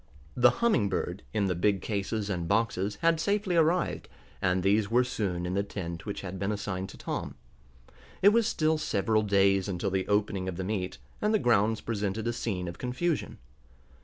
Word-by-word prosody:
The 125 Hz, 0 st, +6 dB, 0.2 s
Humming 120 Hz, -, +3 dB
Bird, 90 Hz, +1 st, -2 dB
in 105 Hz, -2 st, +1 dB
the 95 Hz, -, +1 dB
big 95 Hz, +2 st, +1 dB
cases 105 Hz, 0 st, -2 dB
and 90 Hz, -4 st, -2 dB
boxes, 105 Hz, -1 st, 0 dB
had 165 Hz, -1 st, +4 dB
safely 200 Hz, +1 st, 0 dB
arrived, 170 Hz, +1 st, +1 dB, 0.3 s
and 90 Hz, 0 st, +1 dB
these 100 Hz, +1 st, +2 dB
were 120 Hz, +2 st, +4 dB
soon 95 Hz, -8 st, -2 dB
in 90 Hz, -, -2 dB
the 100 Hz, -, +2 dB
tent 85 Hz, -4 st, -6 dB
which 100 Hz, -, -4 dB
had 95 Hz, -1 st, -6 dB
been 100 Hz, +2 st, -1 dB
assigned 100 Hz, -2 st, -3 dB
to -, -, -11 dB
Tom. -, -, -4 dB, 0.9 s
It 200 Hz, -, +9 dB
was 225 Hz, +1 st, +3 dB
still 155 Hz, -6 st, +1 dB
several 110 Hz, -4 st, +1 dB
days 100 Hz, -2 st, +3 dB
until 95 Hz, 0 st, -2 dB
the 95 Hz, 0 st, -1 dB
opening 100 Hz, -2 st, 0 dB
of 90 Hz, -, -6 dB
the 95 Hz, -, -3 dB
meet, 95 Hz, -7 st, -3 dB, 0.2 s
and 210 Hz, +1 st, +2 dB
the -, -, +6 dB
grounds 110 Hz, -, +2 dB
presented 105 Hz, -1 st, -2 dB
a 120 Hz, -, 0 dB
scene 95 Hz, -6 st, -3 dB
of 85 Hz, +1 st, -7 dB
confusion. 145 Hz, +7 st, -2 dB
100 Hz, 190 wpm, -29 LUFS, 95-120 Hz, 0.9 s, It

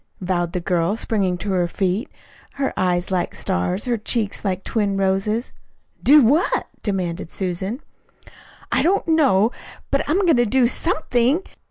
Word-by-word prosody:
vowed 175 Hz, -2 st, -1 dB
the 180 Hz, -, -1 dB
girl, 175 Hz, +2 st, 0 dB
springing 195 Hz, -6 st, 0 dB
to 200 Hz, +3 st, -4 dB
her 180 Hz, -2 st, +1 dB
feet, 190 Hz, +5 st, -1 dB, 0.4 s
her 275 Hz, -1 st, -2 dB
eyes 180 Hz, 0 st, 0 dB
like 180 Hz, -2 st, -1 dB
stars, 180 Hz, -, -1 dB
her 240 Hz, -3 st, 0 dB
cheeks 215 Hz, -1 st, -1 dB
like 190 Hz, -2 st, -2 dB
twin 205 Hz, -3 st, -1 dB
roses. 195 Hz, +4 st, 0 dB, 0.5 s
"Do 290 Hz, +1 st, +7 dB
what?" 290 Hz, +10 st, +2 dB, 0.2 s
demanded 180 Hz, -5 st, -3 dB
Susan. 190 Hz, -, -3 dB, 0.9 s
"I -, -, +2 dB
don't 375 Hz, +3 st, +1 dB
know. 260 Hz, -, +3 dB, 0.4 s
But, 275 Hz, -, +2 dB
I'm 355 Hz, +6 st, +2 dB
going 325 Hz, -7 st, +4 dB
to 240 Hz, -, +3 dB
do 255 Hz, +3 st, +3 dB
SOMETHING. 295 Hz, 0 st, +1 dB
205 Hz, 150 wpm, -21 LUFS, 185-250 Hz, 0.9 s, Do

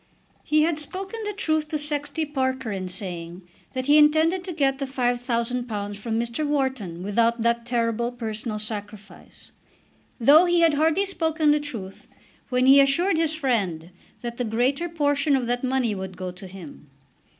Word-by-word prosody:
He 305 Hz, 0 st, +3 dB
had 320 Hz, -1 st, 0 dB
spoken 385 Hz, +8 st, -5 dB
the 420 Hz, -, -2 dB
truth 315 Hz, -6 st, 0 dB
to 305 Hz, -, -2 dB
Sexty 295 Hz, +1 st, -1 dB
Parker 260 Hz, -4 st, -2 dB
in 190 Hz, -2 st, -4 dB
saying 175 Hz, -1 st, -5 dB, 0.3 s
that 255 Hz, -1 st, -3 dB
he 295 Hz, +2 st, +6 dB
intended 315 Hz, +4 st, +4 dB
to 370 Hz, -, -4 dB
get 275 Hz, -4 st, 0 dB
the 275 Hz, -, -1 dB
£5000 240 Hz, -4 st, -2 dB
from 225 Hz, +2 st, -3 dB
Mr. 235 Hz, +5 st, -2 dB
Wharton 265 Hz, -, -2 dB
without 230 Hz, +3 st, +1 dB
that 235 Hz, 0 st, 0 dB
terrible 235 Hz, 0 st, 0 dB
personal 220 Hz, -2 st, -5 dB
sacrifice, 205 Hz, -3 st, -8 dB, 0.7 s
though 290 Hz, +9 st, +7 dB
he 350 Hz, -1 st, +3 dB
had 330 Hz, -2 st, +5 dB
hardly 320 Hz, +6 st, +2 dB
spoken 320 Hz, -5 st, +1 dB
the 300 Hz, -, +3 dB
truth 225 Hz, -10 st, -7 dB, 0.4 s
when 250 Hz, 0 st, +2 dB
he 270 Hz, +1 st, +8 dB
assured 325 Hz, +7 st, +2 dB
his 320 Hz, -1 st, 0 dB
friend 195 Hz, -, -1 dB, 0.3 s
that 235 Hz, -1 st, -5 dB
the 250 Hz, -, -1 dB
greater 250 Hz, +9 st, 0 dB
portion 290 Hz, -2 st, +1 dB
of 260 Hz, -2 st, 0 dB
that 245 Hz, +1 st, -1 dB
money 255 Hz, -3 st, +1 dB
would 190 Hz, -2 st, -6 dB
go 185 Hz, -1 st, -4 dB
to 185 Hz, +2 st, -11 dB
him. 175 Hz, -6 st, -12 dB
255 Hz, 165 wpm, -24 LUFS, 215-300 Hz, 0.7 s, he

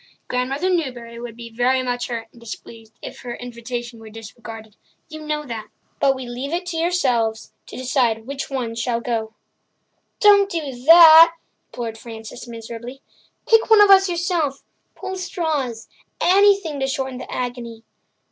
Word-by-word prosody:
Grandmother 270 Hz, +8 st, -1 dB
Newbury 245 Hz, -9 st, -3 dB
would 235 Hz, -1 st, -8 dB
be 235 Hz, -1 st, -9 dB
very 250 Hz, +3 st, +1 dB
much 245 Hz, -1 st, -2 dB
hurt 230 Hz, -2 st, -5 dB
and 235 Hz, -, -19 dB
displeased 225 Hz, -1 st, -11 dB
if -, -, -8 dB
her 240 Hz, -1 st, -6 dB
invitation 240 Hz, -1 st, -7 dB
were 220 Hz, -1 st, -12 dB
disregarded—you 225 Hz, +6 st, -12 dB
know 300 Hz, 0 st, -3 dB
that. 230 Hz, -4 st, -6 dB, 0.3 s
But 270 Hz, -1 st, +3 dB
we 260 Hz, -1 st, -7 dB
leave 250 Hz, +4 st, -5 dB
it 350 Hz, +2 st, -2 dB
to 335 Hz, -, -4 dB
yourselves 250 Hz, -11 st, 0 dB
to -, -, -10 dB
decide 245 Hz, -4 st, 0 dB
which 275 Hz, +1 st, -5 dB
one 250 Hz, -4 st, -3 dB
shall 230 Hz, +1 st, -1 dB
go." 225 Hz, -2 st, -3 dB, 0.8 s
"Don't 405 Hz, -3 st, +6 dB
do 320 Hz, -7 st, -3 dB
that," 330 Hz, 0 st, +9 dB, 0.3 s
implored 225 Hz, -2 st, -6 dB
Frances 225 Hz, +1 st, -10 dB
miserably. 235 Hz, +3 st, -9 dB, 0.4 s
"Pick 450 Hz, 0 st, +4 dB
one 440 Hz, -1 st, +7 dB
of 410 Hz, -1 st, +7 dB
us 390 Hz, 0 st, +6 dB
yourself—pull 345 Hz, +1 st, -4 dB
straws—anything 335 Hz, -, 0 dB
to 270 Hz, -, 0 dB
shorten 265 Hz, -2 st, -3 dB
the -, -, -9 dB
agony." 240 Hz, -2 st, -5 dB
250 Hz, 145 wpm, -21 LUFS, 230-320 Hz, 0.8 s, that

